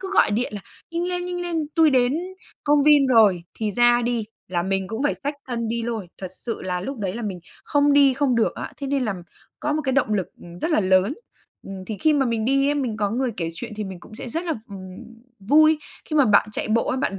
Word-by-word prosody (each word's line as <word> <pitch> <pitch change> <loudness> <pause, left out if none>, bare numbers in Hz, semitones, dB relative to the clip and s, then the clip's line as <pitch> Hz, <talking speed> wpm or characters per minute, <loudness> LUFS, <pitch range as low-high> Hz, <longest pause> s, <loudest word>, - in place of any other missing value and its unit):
cứ 385 0 -6
gọi - - +5
điện 220 +3 -1
là: 205 - -5 0.3
"Nhanh 335 +1 -2
lên, 360 0 -2
nhanh 355 0 -3
lên 335 -3 -2
tui 320 -2 +5
đến 255 +1 +3 0.5
công 290 -1 +4
viên 290 -2 +6
rồi, 210 -8 +5
thì 215 -2 -2
ra 240 +2 +4
đi!", 235 -2 -1 0.2
là 175 -1 -1
mình 190 0 -1
cũng 225 +5 -3
phải 290 - +1
xách 285 +1 -4
thân 235 -2 -2
đi 230 0 -2
lôi. 225 -6 -4
Thật 185 -2 -6 0.2
sự 230 - -3
là, 180 -1 -2
lúc 270 +6 -5
đấy 190 -3 -2
là 235 - -5
mình 190 -5 -4 0.2
không 290 0 +3
đi 280 -2 +5
không 270 -2 +1
được 230 - +1
á. - - -6
Thế 280 - -5
nên 275 -2 0
là 215 - -1 0.5
có 300 - 0
một 310 +1 -1
cái 265 - 0
động 250 -6 +2
lực 190 -3 -1 0.3
rất 335 - -1
là 305 - +3
lớn. 190 +5 +3 0.7
Thì 215 - -4
khi 310 -1 +4
mà 275 -3 +2
mình 230 -2 -1
đi 275 +3 +2
ấy, 290 - +2
mình 255 -7 -2
có 205 -1 0
người 250 +3 0
kể 165 -2 -2
chuyện 170 - -7
thì 215 - -3
mình 190 -2 -8
cũng 215 - -13
sẽ 230 - -7
rất 330 +8 -3
là, 330 -3 -1
ừm, 185 -2 -9 0.4
vui. 310 +9 +5 0.3
Khi 310 - -3
mà 285 - +6
bạn 210 -2 +4
chạy - - -3
bộ 230 +2 +1
ấy, - - 0
bạn 200 -7 -1
240 Hz, 255 wpm, -23 LUFS, 210-290 Hz, 0.7 s, viên